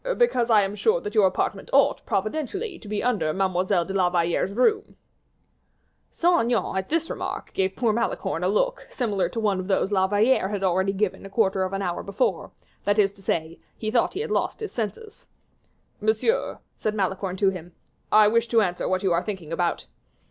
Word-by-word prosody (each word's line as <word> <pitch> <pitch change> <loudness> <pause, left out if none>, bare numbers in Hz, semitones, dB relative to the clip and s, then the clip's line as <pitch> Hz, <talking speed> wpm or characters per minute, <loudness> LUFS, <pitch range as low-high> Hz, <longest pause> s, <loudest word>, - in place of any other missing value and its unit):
"Because 255 - +2
I 215 -3 +5
am 195 +1 -2
sure 445 - +2
that 420 -4 -6
your 200 -3 +5
apartment 185 - -2
ought, - - +3
providentially, 360 - -2
to 215 - -13
be 210 0 -2
under 220 -11 +1
Mademoiselle 185 -1 +1
de 195 - -5
la 185 -2 +2
Valliere's 175 +1 0
room." 415 - +1 1.1
Saint 345 0 +2
Aignan, 235 -4 0
at 190 0 -2
this 330 +1 0
remark, - - -5
gave 190 0 0
poor 230 -3 +1
Malicorne 235 - -2
a - - +2
look, - - 0
similar 210 -7 -1
to 230 - -4
one 205 -4 +1
of 185 - -5
those 195 0 +1
La 190 -2 +3
Valliere 210 +2 +3
had 205 -2 -3
already 190 +1 +2
given 195 0 -2
a 195 - -9
quarter 195 -2 +1
of 185 0 -1
an 195 0 -2
hour 175 -2 -2
before, 200 +5 -1 0.3
that 205 +1 +1
is 200 -2 +4
to 200 - -19
say, 165 -3 -2 0.2
he 215 -1 -3
thought 235 +8 +1
he 400 - -2
had 455 -1 -4
lost - - -1
his 435 -2 -5
senses. 405 - -6 0.7
"Monsieur," 220 - 0 0.2
said 215 0 -1
Malicorne 190 -1 -2
to 195 0 +3
him, 175 -2 -9 0.4
"I 215 0 +7
wish 230 +2 +2
to 230 -1 +3
answer 180 -3 -1
what 185 +1 0
you 190 - +2
are 170 - +2
thinking 180 -5 -6
about." 170 0 -1
205 Hz, 200 wpm, -25 LUFS, 190-235 Hz, 1.1 s, I